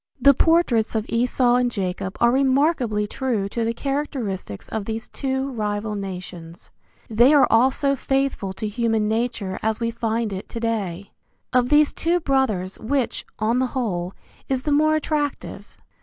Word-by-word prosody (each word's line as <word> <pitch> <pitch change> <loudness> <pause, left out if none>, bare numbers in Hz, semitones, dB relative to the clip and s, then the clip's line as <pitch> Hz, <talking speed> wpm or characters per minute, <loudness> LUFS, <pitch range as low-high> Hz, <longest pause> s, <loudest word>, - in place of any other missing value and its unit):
The 280 - +7
portraits 275 -9 +2
of 220 -1 0
Esau 245 +1 +2
and 250 0 +2
Jacob 190 -3 -3
are 235 0 +4
remarkably 265 -5 +2
true 220 -3 -2
to 230 +3 -2
the 225 - 0
characteristics 240 - -4
of 220 -2 -4
these 225 +1 -4
two 265 0 -2
rival 210 -2 -2
nations. 180 -4 -7 0.4
They 240 +7 +5
are 285 - +7
also 265 +4 +3
faithful 270 -7 -1
to 215 +3 -4
human 225 0 0
nature 220 -4 -2
as 220 0 -1
we 230 -1 -1
find 230 -2 -2
it 190 - -7
to 230 - -5
day. 200 -5 -3 0.4
Of 250 -1 +3
these 300 0 +4
two 345 +2 +1
brothers 245 - 0
which, 260 +2 -2
on 225 +3 +1
the 260 - +1
whole, 185 -7 -2 0.4
is 260 -1 0
the 300 - -1
more 310 +2 +4
attractive? 300 -1 -3
230 Hz, 155 wpm, -23 LUFS, 210-270 Hz, 0.4 s, The